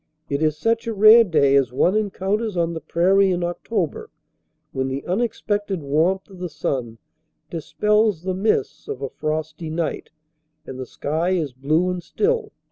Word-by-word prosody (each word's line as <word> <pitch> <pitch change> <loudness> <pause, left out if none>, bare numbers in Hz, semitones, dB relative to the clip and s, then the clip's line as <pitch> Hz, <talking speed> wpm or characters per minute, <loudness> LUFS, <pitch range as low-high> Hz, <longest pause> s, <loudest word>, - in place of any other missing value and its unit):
It 140 +1 0
is 155 -1 +1
such 230 +6 0
a 225 - -2
rare 215 +3 +8
day 145 -8 +3
as 135 -4 +3
one 175 +9 +2
encounters 205 0 -1
on 170 0 0
the 160 - -5
prairie 190 +5 +3
in 180 -1 0
October 175 0 -3 0.6
when 130 0 -2
the 135 +1 -4
unexpected 205 -2 -1
warmth 165 +7 +1
of 190 -2 -14
the 180 -1 -4
sun 130 -7 -3 0.5
dispels 210 +2 +1
the 185 0 -1
mists 190 -6 -1
of 135 - -5
a 135 - -2
frosty 155 +1 -4
night 160 0 -3 0.6
and 130 -1 -8
the 130 - -5
sky 160 +9 -1
is 155 -8 -1
blue 155 +8 +1
and 180 -1 -4
still. 435 - -1
175 Hz, 165 wpm, -22 LUFS, 150-205 Hz, 0.6 s, rare